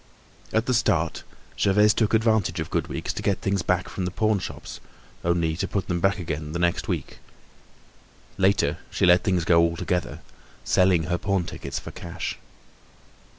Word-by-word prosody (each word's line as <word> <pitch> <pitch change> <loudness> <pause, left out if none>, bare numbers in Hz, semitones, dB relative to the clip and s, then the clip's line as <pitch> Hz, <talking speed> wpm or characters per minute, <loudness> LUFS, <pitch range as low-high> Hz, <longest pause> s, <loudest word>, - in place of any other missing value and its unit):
At 110 +1 +1
the 130 - +1
start, 85 -9 +1 0.4
Gervaise 105 +2 +4
took 110 -1 +2
advantage 110 -6 +2
of 80 - -4
good - - 0
weeks - - -4
to - - -5
get 100 - +1
things 100 -1 0
back 90 +1 0
from 95 - -4
the - - -1
pawn 110 +2 +1
shops, - - -7 0.4
only 85 -2 +1
to 95 +3 -2
put 100 - -2
them 85 -1 -1
back 95 +3 +2
again 80 -4 -4
the - - -1
next 85 0 0
week. - - -4 1.2
Later 95 +1 +2
she - - +1
let 90 0 +5
things 90 -4 +1
go 85 -1 +5
altogether, 85 +1 -1 0.4
selling 90 -3 +3
her 90 +1 -1
pawn 100 -2 0
tickets 70 -5 -6
for - - -6
cash. 85 0 -6
90 Hz, 170 wpm, -25 LUFS, 85-100 Hz, 1.2 s, let